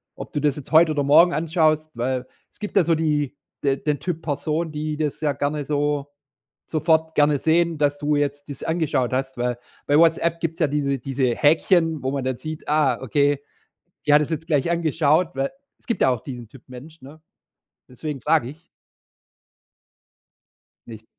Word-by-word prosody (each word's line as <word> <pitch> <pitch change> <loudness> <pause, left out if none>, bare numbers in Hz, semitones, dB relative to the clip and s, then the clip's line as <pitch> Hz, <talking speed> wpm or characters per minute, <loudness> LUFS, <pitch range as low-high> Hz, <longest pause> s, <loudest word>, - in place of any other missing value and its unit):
ob - - -9
du 145 - -1
das 150 -1 +1
jetzt 145 - -10
heute 160 0 +6
oder 145 -2 0
morgen 165 +5 +6
anschaust“, 155 -1 +1
weil 125 +1 -2 0.3
es - - -20
gibt 210 -1 -6
ja 195 - +5
so 165 +1 +2
die 150 -3 -1 0.3
de 135 -1 +2
den 145 0 -1
Typ 170 -3 -4
Person, 155 +2 -2
die 150 0 -4
das 150 -1 -2
ja 150 -2 +1
gerne 145 +1 -2
so 145 -1 -1 0.6
sofort 160 0 +1
gerne 145 -1 +3
sehen, 165 0 +2
dass 145 -1 +1
du 150 0 0
jetzt 145 0 -2
das 140 - -8
angeschaut 155 -7 0
hast, 135 0 -2
weil 120 0 -1 0.3
bei 145 +1 +4
Whatsapp 165 0 +3
gibt's 165 0 -3
ja 155 - +3
diese 140 -2 -1
diese 130 -1 -1
Häkchen, 160 0 +2
wo 130 - -1
man 140 -2 -2
dann 130 -2 -1
sieht: 155 -1 -7
„Ah, 145 -5 +2
okay, 140 +2 +1 0.7
die 145 - +5
hat 150 - +6
das 150 - -4
jetzt 160 0 -3
gleich 155 +1 +1
angeschaut“, 160 0 +2
weil 135 +1 -1 0.3
es - - -23
gibt 235 - -2
ja 130 - +5
auch 120 -3 -1
diesen 120 -4 -8
Typ 130 +1 -16
Mensch, 140 +5 -12
ne? 150 +4 -13 0.7
Deswegen 135 0 -6
frage 120 +1 +2
ich. 165 +4 -14 2.2
Nicht. 110 -1 -11
150 Hz, 185 wpm, -23 LUFS, 135-160 Hz, 2.2 s, heute